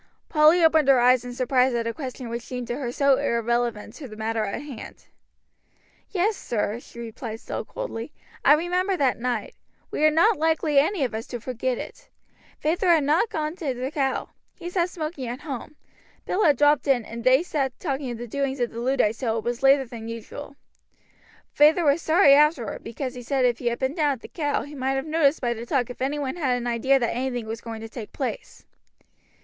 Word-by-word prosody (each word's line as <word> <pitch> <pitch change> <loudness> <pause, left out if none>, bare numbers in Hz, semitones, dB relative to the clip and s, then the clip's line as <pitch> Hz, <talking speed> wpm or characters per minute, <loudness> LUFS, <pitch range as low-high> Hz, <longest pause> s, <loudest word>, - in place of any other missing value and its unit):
Polly 310 +3 +5
opened 320 -3 +5
her 270 -2 +6
eyes 250 0 +4
in 245 - -6
surprise 255 0 +2
at 230 -1 -1
a 230 - -2
question 260 -3 -6
which 235 +1 -4
seemed 250 0 -6
to 240 - -1
her 255 -4 -3
so 275 +1 +3
irrelevant 235 -1 -1
to 285 - -9
the 215 - -10
matter 220 0 -1
in 200 - -4
hand; 285 -5 -10 1.0
"Yes, 405 +3 +1
sir," 220 - -2
she 240 - -16
replied, 225 -1 -6
still - - -5
coldly. 300 - -6 0.3
"I - - +7
remember 360 +4 0
that 265 -6 +1
night. 240 -3 -2 0.4
We - - -1
are 310 - +7
not 340 +7 +3
likely 315 -2 +3
any 315 +2 +1
of 245 - -2
us 220 +2 -5
to 240 - -5
forget 250 +1 -2
it. - - -9 0.5
Feyther 350 +6 0
had 325 -4 +5
not 310 +10 +2
gone 310 -5 -3
to 280 -8 -2
the 255 +3 -4
'Cow.' 270 -3 -1 0.3
He 350 -1 -7
sat 355 -1 +1
smoking 310 -6 -5
at 245 +3 -5
home. 290 0 -6 0.5
Bill 420 - 0
had 295 -3 +5
dropped 295 0 +3
in, 250 -5 +2
and 230 0 -7
they 260 +5 +5
sat 275 -7 -2
talking 275 -4 -3
of 240 - -4
the 240 - -6
doings 275 +2 -2
of 240 -1 0
the 230 - -6
Luddites 240 -3 +1
till 230 -4 0
it 220 - -3
was 240 0 -3
later 270 0 +5
than 230 -2 -8
usual. 230 +5 -8 1.0
Feyther 315 +3 +5
was 290 +3 +3
sorry 320 -3 +5
afterward, 290 -5 +2
because 255 +2 -5
he 250 - -8
said 260 +1 +1
if 245 -1 +1
he 240 - -3
had 235 0 0
been 265 +1 -1
down 300 -3 +2
at 250 - -9
the - - -9
'Cow' 290 -4 -1
he 290 - -10
might 265 -1 -1
have 270 +1 -2
noticed 310 -2 +2
by 240 -2 0
the 230 0 -7
talk 250 -2 0
if 250 - -11
any 275 +3 0
one 285 +2 -3
had 260 -7 +1
an 245 - -5
idea 240 +3 +2
that 240 -3 -1
anything 245 -2 -2
was 225 +1 -5
going 225 -1 -7
to 225 - -6
take 225 -1 -8
place." 265 -3 -5
265 Hz, 220 wpm, -25 LUFS, 240-300 Hz, 1.0 s, I